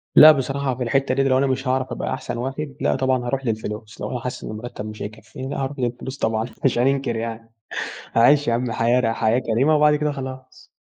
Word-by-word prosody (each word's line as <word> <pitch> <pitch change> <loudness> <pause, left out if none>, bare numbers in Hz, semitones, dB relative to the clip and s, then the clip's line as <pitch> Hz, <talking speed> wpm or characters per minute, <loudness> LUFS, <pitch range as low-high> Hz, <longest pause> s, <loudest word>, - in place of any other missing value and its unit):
لأ، 155 +1 +11
بصراحة 135 -2 -1
في 125 - -3
الحتة 135 +2 +1
دِيَّة 135 - +2
لو 130 -1 +3
أنا 135 +1 +2
مش 130 0 -1
هاعرف 130 0 +1
أبقى - - -3
أحسن - - -4
واحد 135 +3 -4
لأ، - - +2
طبعًا 130 -2 +1
هاروح 135 +2 -2
للفلوس، 110 -1 -4
لو - - -3
أنا 125 - -2
حاسس 125 +1 -5
إن - - -5
المرتب 110 -1 -7
مش 105 0 -8
هيكفيني، 110 +5 -7
لأ، 145 - -3
هاروح 135 +1 -4
للفلوس 125 +3 -3
طبعًا 110 0 0 0.2
مش 125 - +3
هاننكر 135 -2 +1
يعني 115 0 -5 0.6
هاعيش 140 +4 +5
يا - - +3
عم 120 -1 -1
حياة 120 +3 +2
ر 115 -2 +1
حياة 115 +2 +2
كريمة 130 +6 +2
وبعد 150 0 +5
كده 150 0 0
خلاص. 130 -1 -8
130 Hz, 220 wpm, -22 LUFS, 115-135 Hz, 0.6 s, لأ